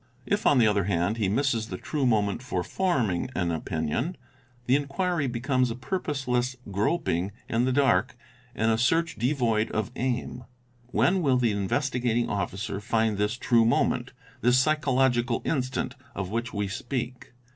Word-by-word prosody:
If -, -, +1 dB
on 145 Hz, -, +5 dB
the 120 Hz, -, +5 dB
other 105 Hz, -3 st, +2 dB
hand 95 Hz, +3 st, 0 dB
he 105 Hz, -4 st, +1 dB
misses 115 Hz, -1 st, 0 dB
the -, -, -5 dB
true 140 Hz, -4 st, -1 dB
moment 105 Hz, -2 st, +1 dB
for 95 Hz, -8 st, -2 dB
forming 125 Hz, -, 0 dB
an 85 Hz, -1 st, 0 dB
opinion, 80 Hz, -, -2 dB, 0.5 s
the 125 Hz, -, +4 dB
inquiry 145 Hz, +2 st, 0 dB
becomes 125 Hz, +1 st, 0 dB
a 115 Hz, -, -3 dB
purposeless 130 Hz, -4 st, -2 dB, 0.2 s
groping 100 Hz, -, 0 dB, 0.2 s
in 115 Hz, +2 st, +1 dB
the 130 Hz, -, +1 dB
dark 135 Hz, -1 st, +2 dB, 0.4 s
and 110 Hz, +1 st, +2 dB
a 110 Hz, -, +1 dB
search 165 Hz, +7 st, +2 dB
devoid 115 Hz, -3 st, +1 dB
of 110 Hz, +1 st, -2 dB
aim. 125 Hz, -1 st, -2 dB, 0.4 s
When 180 Hz, +8 st, +2 dB
will 135 Hz, -5 st, +3 dB
the 120 Hz, -3 st, +2 dB
Investigating 120 Hz, +3 st, 0 dB
Officer 100 Hz, 0 st, -3 dB
find 110 Hz, -1 st, 0 dB
this 105 Hz, +3 st, 0 dB
true 120 Hz, -2 st, +3 dB
moment, 115 Hz, -, +1 dB, 0.3 s
this 125 Hz, +2 st, +4 dB
psychological 130 Hz, -4 st, +2 dB
instant, 130 Hz, -3 st, -1 dB, 0.2 s
of 95 Hz, -1 st, -4 dB
which 115 Hz, +2 st, -2 dB
we 100 Hz, -1 st, -2 dB
speak 125 Hz, +5 st, -5 dB
120 Hz, 155 wpm, -27 LUFS, 105-135 Hz, 0.5 s, on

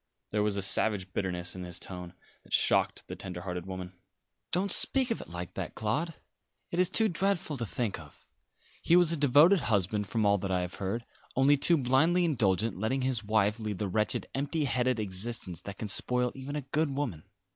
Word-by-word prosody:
There 105 Hz, -, +1 dB
was 105 Hz, -1 st, 0 dB
a 100 Hz, -, +1 dB
savage 95 Hz, -2 st, +1 dB
bitterness 90 Hz, -2 st, -1 dB
in 90 Hz, -, -6 dB
his 90 Hz, 0 st, -5 dB
tone 90 Hz, -1 st, -8 dB, 0.3 s
that -, -, -12 dB
shocked -, -, +2 dB
the -, -, -6 dB
tender 90 Hz, -2 st, -7 dB
hearted 90 Hz, -1 st, -5 dB
woman. 95 Hz, -1 st, -6 dB, 0.6 s
"Don't 190 Hz, +2 st, +1 dB
speak 260 Hz, +4 st, +3 dB
of 230 Hz, -, -1 dB
it -, -, -11 dB
like 90 Hz, 0 st, -6 dB
that, -, -, -5 dB
Claude. 150 Hz, +10 st, -1 dB, 0.6 s
It 175 Hz, -, -2 dB
is 180 Hz, -1 st, +4 dB
too 220 Hz, +3 st, +4 dB
dreadful 185 Hz, -4 st, -1 dB
to 115 Hz, -2 st, -3 dB
think 110 Hz, -6 st, -2 dB
of. 75 Hz, -2 st, -15 dB, 0.6 s
He 170 Hz, -, +4 dB
was 175 Hz, -2 st, +5 dB
a -, -, +2 dB
devoted 150 Hz, +6 st, +5 dB
husband, 105 Hz, -, 0 dB
from 110 Hz, +1 st, 0 dB
all 100 Hz, 0 st, +4 dB
that 95 Hz, -, -4 dB
I 90 Hz, -1 st, +1 dB
have 90 Hz, 0 st, -5 dB
heard; 110 Hz, +5 st, -2 dB, 0.3 s
only 135 Hz, +2 st, +5 dB
too 155 Hz, +4 st, +5 dB
blindly 155 Hz, +7 st, +3 dB
indulgent, 110 Hz, -, +1 dB
letting 130 Hz, +5 st, 0 dB
his 130 Hz, -4 st, -1 dB
wife 105 Hz, +1 st, +1 dB
lead 105 Hz, -3 st, -4 dB
the 105 Hz, -, -2 dB
wretched, 105 Hz, +3 st, 0 dB
empty 145 Hz, +3 st, -1 dB
headed 125 Hz, -2 st, +1 dB
existence 95 Hz, -3 st, -2 dB
that 100 Hz, +1 st, -8 dB
can 110 Hz, -, -4 dB
spoil 125 Hz, +4 st, 0 dB
even 135 Hz, +2 st, -7 dB
a 150 Hz, -, -2 dB
good 145 Hz, +3 st, -1 dB
woman." 135 Hz, -, -3 dB
110 Hz, 200 wpm, -30 LUFS, 95-145 Hz, 0.6 s, was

